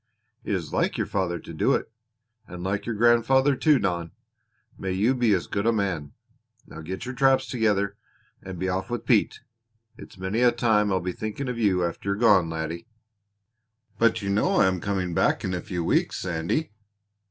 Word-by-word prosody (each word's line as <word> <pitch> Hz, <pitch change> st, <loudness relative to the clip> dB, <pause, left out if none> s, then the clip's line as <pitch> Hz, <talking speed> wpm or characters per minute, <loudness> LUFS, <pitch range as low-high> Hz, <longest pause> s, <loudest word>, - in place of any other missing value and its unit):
"It 100 Hz, -, -1 dB
is 85 Hz, -5 st, -5 dB
like -, -, 0 dB
your -, -, 0 dB
father 95 Hz, -3 st, -1 dB
to -, -, -10 dB
do -, -, +2 dB
it -, -, -4 dB, 0.6 s
and 90 Hz, 0 st, -8 dB
like 100 Hz, +3 st, -2 dB
your 115 Hz, -, -2 dB
grandfather, 120 Hz, +5 st, +4 dB
too, 150 Hz, +2 st, +4 dB
Don. 85 Hz, -6 st, -2 dB, 0.6 s
May 95 Hz, -1 st, -4 dB
you 105 Hz, +7 st, +2 dB
be 120 Hz, -4 st, +2 dB
as 90 Hz, -, -2 dB
good 100 Hz, +3 st, -2 dB
a -, -, +5 dB
man! 90 Hz, -10 st, -2 dB, 0.5 s
Now 80 Hz, -, -10 dB
get 95 Hz, +8 st, -6 dB
your 125 Hz, -, -5 dB
traps 135 Hz, 0 st, +3 dB
together 105 Hz, -4 st, 0 dB, 0.4 s
and 95 Hz, -1 st, -8 dB
be 95 Hz, -, -2 dB
off 95 Hz, +1 st, -2 dB
with 120 Hz, 0 st, -4 dB
Pete. 115 Hz, -5 st, +2 dB, 0.6 s
It's -, -, -12 dB
many 95 Hz, +5 st, -2 dB
a 125 Hz, -1 st, +5 dB
time 110 Hz, -4 st, +2 dB
I'll 95 Hz, -2 st, +1 dB
be 90 Hz, +1 st, -3 dB
thinking 110 Hz, +8 st, -5 dB
of 120 Hz, -1 st, -4 dB
you 95 Hz, -5 st, +2 dB
after 85 Hz, +3 st, -4 dB
you -, -, +2 dB
are -, -, -8 dB
gone, 100 Hz, -7 st, +4 dB
laddie." 80 Hz, +4 st, -5 dB, 1.1 s
"But 115 Hz, -2 st, +2 dB
you 100 Hz, -, -1 dB
know 145 Hz, -, +1 dB
I -, -, +5 dB
am 95 Hz, -2 st, 0 dB
coming 95 Hz, -2 st, -2 dB
back -, -, +1 dB
in 95 Hz, -, -2 dB
a 90 Hz, -, -2 dB
few 90 Hz, -2 st, -4 dB
weeks, -, -, +1 dB
Sandy." 90 Hz, -, -2 dB
100 Hz, 200 wpm, -25 LUFS, 90-115 Hz, 1.1 s, a